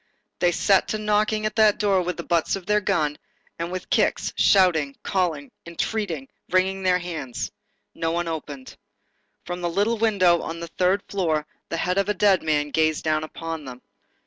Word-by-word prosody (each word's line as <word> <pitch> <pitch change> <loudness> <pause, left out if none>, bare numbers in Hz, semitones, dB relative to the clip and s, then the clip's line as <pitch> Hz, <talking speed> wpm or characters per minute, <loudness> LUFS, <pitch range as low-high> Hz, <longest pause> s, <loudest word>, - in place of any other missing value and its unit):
They 175 - +3
set 195 +3 +3
to 215 - -1
knocking 215 0 +1
at 215 - -2
that 215 -2 +5
door 200 -3 +2
with 180 0 -3
the 170 - -5
butts 170 +1 +1
of 195 -2 -8
their 210 +1 +2
guns, 155 -7 0 0.4
and 170 +1 -3
with 185 -1 -6
kicks, - - +1
shouting, 160 -8 +3
calling, 170 -7 -1 0.2
entreating, 170 -4 -3 0.2
wringing 190 +1 +1
their 185 -1 +3
hands. 160 -9 -5 0.4
No 165 0 -2
one 170 +1 -1
opened. 145 -5 -6 0.7
From 175 0 -5
the 175 - -1
little 210 +6 0
window 185 -6 +3
on 165 +1 -5
the 170 0 -7
third 185 +4 +1
floor, 160 -6 0 0.2
the 165 - -2
head 180 +3 0
of 195 - 0
the 210 - 0
dead 195 -1 +4
man 150 -2 0
gazed 155 0 +1
down 155 -1 +1
upon 160 -1 -6
them. 125 -1 -10
175 Hz, 180 wpm, -24 LUFS, 160-195 Hz, 0.7 s, that